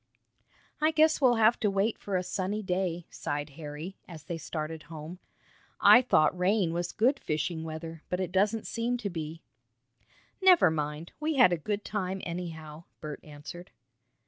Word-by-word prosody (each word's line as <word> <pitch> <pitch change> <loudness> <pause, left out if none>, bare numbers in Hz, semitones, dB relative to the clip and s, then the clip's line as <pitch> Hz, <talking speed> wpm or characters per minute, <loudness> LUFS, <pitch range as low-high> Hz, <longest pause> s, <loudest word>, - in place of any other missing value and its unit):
"I 310 - +5
guess 315 -1 +3
we'll 250 -3 +5
have 225 +1 +4
to 210 - +2
wait 200 +3 0
for 200 - -3
a 180 - -1
sunny 195 +3 -2
day," 180 -2 -1
sighed 145 0 -4
Harry, 150 +5 -7
as 165 -4 -10
they 165 +1 -5
started 160 0 -5
home. 160 +2 -8 0.6
"I 245 - +8
thought 185 -9 +3
rain 180 -1 +2
was 175 0 -2
good 260 +5 +2
fishing 160 +2 -2
weather, 160 0 -7
but 180 - -1
it 185 -2 -2
doesn't 205 +4 +1
seem 235 +2 -1
to 205 -5 -4
be." 160 -1 -6 1.0
"Never 365 - +7
mind, 150 +1 -3
we 310 0 -1
had 245 -9 +6
a - - +3
good 200 +6 -3
time, 195 -2 -2
anyhow." 165 -2 -6
Bert 150 -1 -6
answered. 155 +4 -10
180 Hz, 165 wpm, -29 LUFS, 160-210 Hz, 1.0 s, I